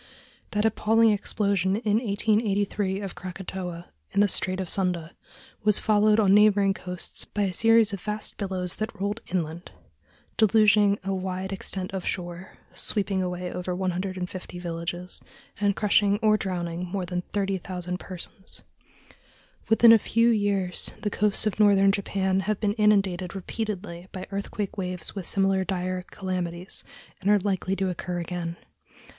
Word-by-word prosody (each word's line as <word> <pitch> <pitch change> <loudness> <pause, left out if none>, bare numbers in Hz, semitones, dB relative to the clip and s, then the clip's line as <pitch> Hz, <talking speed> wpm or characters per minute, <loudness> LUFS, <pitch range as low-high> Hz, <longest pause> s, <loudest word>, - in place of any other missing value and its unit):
That 210 +1 0
appalling 225 +1 +4
explosion 200 -2 0
in 215 -1 +1
1883 205 -3 0
of 195 -2 -5
Krakatoa, 180 0 -7 0.2
in - - 0
the 205 - +5
Strait 185 0 0
of 190 - -3
Sunda, 180 -3 0 0.5
was 210 -1 +5
followed 215 0 +3
on 195 -3 +5
neighboring 205 -1 +5
coasts 180 -1 -2
by 205 - -2
a 190 -2 -1
series 225 0 +4
of 195 - -4
vast 210 0 -3
billows 185 -3 -2
that 215 -1 -4
rolled 205 +3 -2
inland, 170 -1 -3 0.7
deluging 210 -1 +5
a 195 0 -1
wide 190 0 -3
extent 190 -1 -3
of 190 -2 -3
shore, 175 0 -5 0.2
sweeping 195 -2 0
away 180 -1 -3
over 180 0 -3
150 185 0 -4
villages, 175 +1 -5 0.4
and 205 -1 +2
crushing 205 -1 +3
or 215 -1 +5
drowning 180 -3 -3
more 185 0 -3
than 180 0 -2
30,000 185 -3 -2
persons. 185 +2 -10 1.1
Within 225 +1 +8
a 225 - +7
few 230 +3 +2
years 200 -5 0
the 210 - -1
coasts 210 +1 +2
of 215 -1 -1
northern 200 -2 +6
Japan 190 -1 0
have 205 +1 -1
been 205 -2 +1
inundated 195 -4 +2
repeatedly 190 -3 -5
by 185 - -6
earthquake 200 +1 -4
waves 180 -2 -1
with 195 -4 -4
similar 195 -1 +2
dire 185 0 -2
calamities, 180 -2 -3 0.4
and 195 - -1
they 210 - +7
are - - +5
likely 195 -1 -1
to 195 0 -1
occur 180 0 -3
again. 170 0 -4
195 Hz, 150 wpm, -26 LUFS, 180-205 Hz, 1.1 s, Within